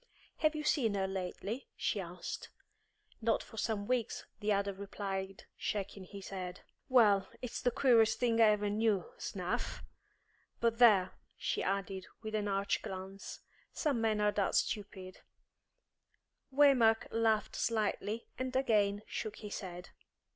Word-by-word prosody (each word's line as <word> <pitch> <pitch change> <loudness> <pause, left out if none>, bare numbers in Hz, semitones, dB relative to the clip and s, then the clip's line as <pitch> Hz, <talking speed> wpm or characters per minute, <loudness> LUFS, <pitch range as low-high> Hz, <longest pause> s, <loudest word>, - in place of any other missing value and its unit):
"Have 310 0 +2
you 305 - -3
seen 240 -8 +2
her 195 -1 +1
lately?" 190 +5 -4
she 205 - -1
asked. 180 0 -6 0.7
"Not 225 0 +2
for 225 - -14
some 215 -2 -1
weeks," 245 -1 -1
the 210 0 0
other 200 0 +1
replied, 195 -1 -5
shaking 195 -1 -3
his 195 +1 -9
head. 180 -2 -5 0.3
"Well, 205 -7 +5 0.2
it's 250 - -4
the 245 - +3
queerest 230 -3 +4
thing 230 -2 +2
I - - +9
ever 210 -1 +3
knew, 215 -3 +2
s'nough! - - -3 0.8
But, 230 0 +1
there," 200 -6 +6 0.3
she - - -1
added, 195 -1 -2 0.2
with 220 0 -5
an 210 -1 0
arch 195 0 0
glance, 190 +1 -7 0.3
"some 280 -7 0
men 220 -2 +2
are 210 0 +3
that 200 -2 0
stupid 190 -3 -2 0.7
" - - -48
Waymark 260 -6 +5
laughed 225 -1 +1
slightly, 215 0 -1
and 255 0 -3
again 210 -5 +2
shook 215 -1 -4
his 210 -1 -6
head. 180 -2 -8
210 Hz, 140 wpm, -34 LUFS, 195-230 Hz, 0.8 s, I